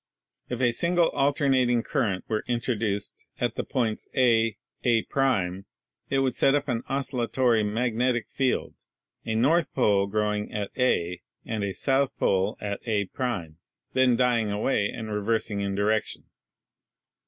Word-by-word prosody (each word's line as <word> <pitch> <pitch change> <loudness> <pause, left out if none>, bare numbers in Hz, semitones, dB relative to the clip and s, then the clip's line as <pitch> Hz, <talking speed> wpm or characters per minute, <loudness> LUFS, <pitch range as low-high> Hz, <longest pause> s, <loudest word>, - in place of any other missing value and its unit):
If 125 0 -3
a 120 -2 +4
single 170 +6 +2
alternating 135 -4 +2
current 100 -8 -1
were 110 -1 -1
introduced 115 -4 -2 0.2
at - - 0
the - - -3
points 115 -4 -2
A 115 -4 +3 0.3
A' 115 -2 +2 1.0
it 135 - +1
would 130 -2 +1
set 135 +3 +3
up 145 0 -1
an 120 -3 -1
oscil 135 -2 -2
latory 120 -1 +2
magnetic 120 +2 0
field, 130 -2 0 0.5
a 110 - 0
N 150 +9 +3
pole 100 -6 +3
growing 105 0 -1
at 105 -2 -3
A, 90 -9 +1 0.2
and 110 -2 -3
a 100 - -1
S 95 +6 -7 0.3
pole 95 0 +1
at 100 -1 -4
A', 100 -4 0 0.8
then 130 -2 +4
dying 120 -3 +2
away 105 0 0
and 110 -2 -6
reversing 105 0 -1
in 100 -1 -2
direction. 105 +2 0
115 Hz, 140 wpm, -26 LUFS, 105-125 Hz, 1.0 s, a